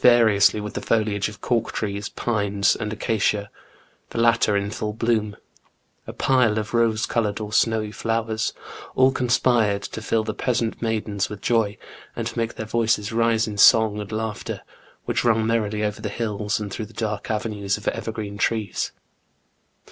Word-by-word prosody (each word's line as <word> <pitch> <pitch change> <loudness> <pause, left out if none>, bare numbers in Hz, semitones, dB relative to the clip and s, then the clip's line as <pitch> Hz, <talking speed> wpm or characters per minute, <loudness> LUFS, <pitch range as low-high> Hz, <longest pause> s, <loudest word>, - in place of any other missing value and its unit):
variously 110 -4 +5
with 105 0 -5
the - - -4
foliage 105 -3 +1
of 105 -2 -13
cork 115 -2 0
trees, 100 -1 -3
pines, 100 -4 +1
and 105 -1 -4
acacia, 105 -1 0 0.6
the - - -7
latter 115 -3 +3
in 100 +1 -2
full 105 -1 -3
bloom, 110 -2 0 0.7
a - - -4
pile 125 -5 +2
of 110 +1 -3
rose 115 -1 +2
coloured 110 -3 -1
or 105 -1 -6
snowy 110 -1 +2
flowers, 115 0 -1 0.2
— - - -14
all 130 +1 +5
conspired 120 -5 +2
to 110 - -6
fill 110 0 +1
the 110 0 -3
peasant 120 -2 -1
maidens 110 -3 -1
with 105 - -7
joy, 110 -2 +1 0.4
and - - -3
to - - -4
make 115 0 -2
their 110 - -5
voices 110 -2 +1
rise 115 0 +2
in 105 -1 -5
song 110 0 +6
and 105 0 -6
laughter, 110 -1 -4 0.4
which - - 0
rung 115 -2 +3
merrily 110 -2 0
over 105 0 -2
the 105 - -3
hills, 105 -1 -2
and 105 -2 -5
through 110 - -4
the 115 - -17
dark 105 -3 -3
avenues 105 -2 -1
of 105 - -10
evergreen 110 -2 -5
trees. 110 -5 -1
110 Hz, 170 wpm, -23 LUFS, 105-115 Hz, 0.7 s, song